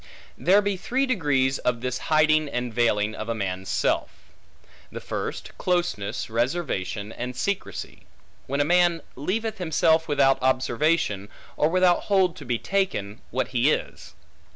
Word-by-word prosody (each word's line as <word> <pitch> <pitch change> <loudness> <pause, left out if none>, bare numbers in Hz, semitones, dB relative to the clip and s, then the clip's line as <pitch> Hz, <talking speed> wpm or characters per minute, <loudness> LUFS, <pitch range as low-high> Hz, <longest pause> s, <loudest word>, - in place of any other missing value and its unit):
There 200 +4 +4
be 200 -1 -1
three 260 +8 0
degrees 145 - +1
of 125 -2 -1
this 125 0 -2
hiding 155 -1 +4
and 125 -3 -3
veiling 110 -3 +1
of 110 +1 -6
a 115 - -1
man's 95 -2 -4
self. - - +1 0.8
The - - -6
first, - - -5
closeness, 175 - -1
reservation, 115 - -2
and 125 +2 -5
secrecy; 200 +7 -4 0.4
when 140 +2 0
a - - +2
man 175 -1 +3
leaveth 220 - -2
himself 160 -1 +2
without 140 -3 +3
observation, 130 -4 +1 0.3
or 150 - +2
without 180 0 +3
hold 190 -4 +2
to - - -9
be 120 -1 0
taken, 180 - -2
what 125 0 -1
he 125 +2 +2
is. - - -3
140 Hz, 145 wpm, -25 LUFS, 120-175 Hz, 0.8 s, There